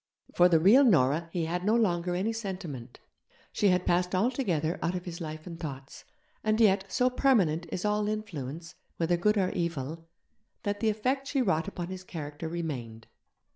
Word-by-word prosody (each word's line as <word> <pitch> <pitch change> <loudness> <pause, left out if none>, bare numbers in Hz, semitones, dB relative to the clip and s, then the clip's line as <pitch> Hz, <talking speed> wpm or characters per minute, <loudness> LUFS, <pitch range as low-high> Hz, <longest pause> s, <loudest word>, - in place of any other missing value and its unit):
For 180 +1 +5
the 165 -2 +5
real 215 - +7
Nora 165 - +3
he 170 -2 -1
had 175 +2 -2
no 215 +3 +3
longer 175 -6 +1
any 205 +5 0
sentiment, 175 - -6 0.5
she 205 - +2
had 180 -1 +2
passed 180 +1 +1
altogether 185 - 0
out 175 - -1
of 180 - -5
his 175 -1 -7
life 155 -1 -6
and 170 -2 -8
thoughts; 140 -4 -8 0.4
and 215 0 +1
yet, 195 -3 +4
so 250 - +2
permanent 190 - +2
is 185 - -3
all 210 0 +1
influence, 165 - -5 0.2
whether 170 +1 +2
good 210 +5 +2
or 185 -2 +1
evil, 165 -1 -3 0.6
that 205 -1 -2
the 220 - +2
effect 260 +6 -1
she 275 -3 +1
wrought 165 -6 +1
upon 175 -3 -5
his 185 0 -7
character 155 -2 -6
remained. 130 -10 -5
180 Hz, 175 wpm, -29 LUFS, 160-210 Hz, 0.6 s, real